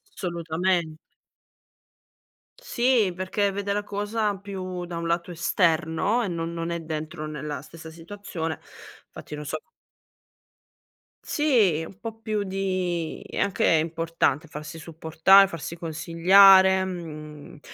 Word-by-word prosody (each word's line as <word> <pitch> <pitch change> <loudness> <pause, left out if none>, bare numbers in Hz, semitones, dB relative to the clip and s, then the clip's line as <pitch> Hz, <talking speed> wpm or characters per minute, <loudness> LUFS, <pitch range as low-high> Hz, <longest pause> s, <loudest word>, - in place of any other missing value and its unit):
Assolutamen 170 -1 -1 1.6
Sì 240 - +2
perché 195 +2 -1
vede 200 +1 -2
la 205 0 -1
cosa 205 0 -2
più 185 -2 -6
da 175 -1 -6
un 170 0 -3
lato 170 +1 -1
esterno 165 +5 +1
e 230 - -1
non 170 -2 -3
non 165 0 -4
è 170 0 -2
dentro 155 0 -5
nella 150 -1 -5
stessa 160 +1 -12
situazione, 165 -1 -6 0.5
fatti 150 - -9
non 150 0 -7
so 155 +2 -4 1.6
Sì, 225 - +2
un 190 +3 -14
po' 225 0 -7
più 215 -2 -2
di 185 -4 -2
è - - -7
anche 200 - 0
importante 165 -1 +1
farsi 155 +1 -8
supportare, 165 +5 +4
farsi 170 -2 -7
consigliare. 190 +4 +5
Mhmm, 155 -5 -8
170 Hz, 120 wpm, -25 LUFS, 160-195 Hz, 1.6 s, consigliare